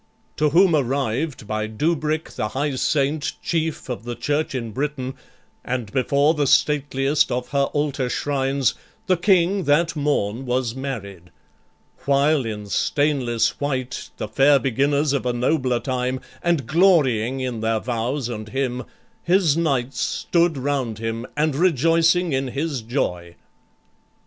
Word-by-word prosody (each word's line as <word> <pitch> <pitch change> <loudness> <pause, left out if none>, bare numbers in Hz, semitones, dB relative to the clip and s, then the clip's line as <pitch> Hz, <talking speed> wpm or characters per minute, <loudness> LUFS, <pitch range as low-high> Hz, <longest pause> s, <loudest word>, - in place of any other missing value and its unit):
To 150 +1 +3
whom 170 +2 +5
arrived, 135 0 -1
by 110 0 -2
Dubric 155 +6 -1
the 105 - -1
high 140 +5 -2
saint, 145 +2 0
Chief 160 -2 -2
of 125 -3 -5
the 120 0 -5
church 145 +1 -1
in 115 -3 -3
Britain, 135 +1 -3 0.5
and 125 -5 -3
before 140 +4 +2
The 145 -3 0
stateliest 145 0 +2
of 125 0 -2
her 140 -1 +2
altar 145 -3 -1
shrines, 135 -2 0 0.3
the 185 -3 +3
King 185 0 +2
That 165 +4 +2
morn 135 -5 -1
was 125 -2 0
married, 100 -10 -6 0.8
while 140 -1 +2
in 105 -2 -5
stainless 125 0 0
white, 130 -3 -3
The - - -4
fair 140 +5 +4
beginners 140 +3 +1
of 140 - 0
a 125 - +1
nobler 125 0 +1
time, 130 0 -2 0.2
And 170 -7 +1
glorying 135 - +3
in 125 -3 -3
their 110 0 +1
vows 125 +3 -2
and 110 -3 -6
him, 130 0 -2 0.4
his 175 -4 +3
knights 135 -6 0
Stood 170 -3 +1
round 130 -5 -2
him, 115 +2 -4
and 150 -1 +1
rejoicing 165 +1 +3
in 135 0 0
his 140 0 -3
joy. 90 -8 -3
135 Hz, 140 wpm, -22 LUFS, 120-150 Hz, 0.8 s, whom